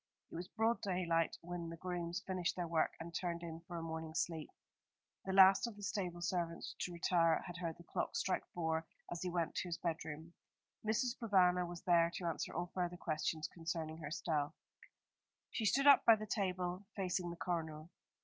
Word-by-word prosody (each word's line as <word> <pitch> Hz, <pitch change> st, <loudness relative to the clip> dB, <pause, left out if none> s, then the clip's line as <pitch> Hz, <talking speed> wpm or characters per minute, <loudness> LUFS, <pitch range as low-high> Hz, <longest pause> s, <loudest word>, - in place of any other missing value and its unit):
It -, -, -8 dB
was 175 Hz, +2 st, -4 dB
broad 225 Hz, +3 st, +1 dB
daylight 175 Hz, -4 st, +1 dB
when 170 Hz, -1 st, -5 dB
the 165 Hz, -, -7 dB
grooms 175 Hz, 0 st, -3 dB
finished 185 Hz, -2 st, -1 dB
their 175 Hz, -2 st, -2 dB
work 165 Hz, -1 st, +2 dB
and 170 Hz, +1 st, -7 dB
turned 170 Hz, 0 st, -2 dB
in 165 Hz, -1 st, -5 dB
for 175 Hz, -, -5 dB
a 165 Hz, -, -4 dB
morning 160 Hz, -1 st, -5 dB
sleep. 165 Hz, -2 st, -1 dB, 0.8 s
The 190 Hz, -, -1 dB
last 190 Hz, +3 st, +7 dB
of 230 Hz, -, -7 dB
the 205 Hz, -, -10 dB
stable 185 Hz, -4 st, -2 dB
servants 170 Hz, -2 st, -2 dB
to 180 Hz, -, -2 dB
retire 170 Hz, -1 st, +3 dB
had 175 Hz, -1 st, -6 dB
heard 165 Hz, -2 st, -3 dB
the 170 Hz, -, -13 dB
clocks -, -, -2 dB
strike 190 Hz, -, 0 dB
four 160 Hz, -1 st, -1 dB, 0.2 s
as 175 Hz, -, -3 dB
he 185 Hz, -, -1 dB
went 170 Hz, -2 st, 0 dB
to -, -, -1 dB
his 170 Hz, -1 st, -2 dB
bedroom. 160 Hz, -1 st, -4 dB, 0.5 s
Mrs. 230 Hz, +3 st, +1 dB
Provana 180 Hz, -6 st, +4 dB
was 175 Hz, 0 st, -7 dB
there 170 Hz, -1 st, +5 dB
to 180 Hz, -, -4 dB
answer 165 Hz, -, -2 dB
all 175 Hz, 0 st, -3 dB
further 180 Hz, -1 st, -1 dB
questions 155 Hz, -1 st, -1 dB
concerning 165 Hz, -2 st, -4 dB
herself. 150 Hz, -1 st, -1 dB, 1.0 s
She 225 Hz, -, -1 dB
stood 275 Hz, +7 st, +3 dB
up 285 Hz, -1 st, +9 dB
by 230 Hz, -, +8 dB
the 215 Hz, 0 st, -5 dB
table, 185 Hz, -2 st, -1 dB
facing 180 Hz, -2 st, -1 dB
the 170 Hz, -, -5 dB
coroner. 160 Hz, -2 st, -3 dB
175 Hz, 190 wpm, -37 LUFS, 165-185 Hz, 1.0 s, up